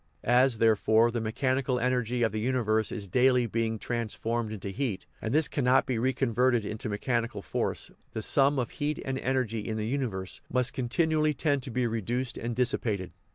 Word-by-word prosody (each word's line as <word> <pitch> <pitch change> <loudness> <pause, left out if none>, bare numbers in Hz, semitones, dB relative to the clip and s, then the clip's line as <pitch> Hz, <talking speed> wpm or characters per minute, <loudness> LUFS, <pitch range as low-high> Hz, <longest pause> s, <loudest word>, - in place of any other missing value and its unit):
As, 125 0 +4
therefore, 110 +1 +4
the 115 -1 -2
mechanical 130 +3 0
energy 125 -1 0
of 115 - +2
the 110 - -3
universe 110 -2 +1
is 105 -4 -3
daily 125 +4 +3
being 115 0 -1
transformed 115 0 -2
into 105 -2 -5
heat, 100 -3 -3 0.2
and 110 - -3
this 155 +2 +3
cannot 130 -1 +2
be 130 -5 -1
reconverted 125 -2 +1
into 110 +2 -4
mechanical 115 +3 -2
force, - - -2 0.2
the 110 - -3
sum 140 +5 +4
of 125 -3 -1
heat 150 0 -2
and 135 0 -2
energy 125 -4 -1
in 110 +1 -4
the 105 - -2
universe 110 -7 -3
must 125 -1 +2
continually 155 +4 +1
tend 140 0 +1
to 130 - -6
be 125 +1 0
reduced 120 +2 -2
and 115 0 -4
dissipated. 110 -6 0
120 Hz, 175 wpm, -28 LUFS, 110-130 Hz, 0.2 s, As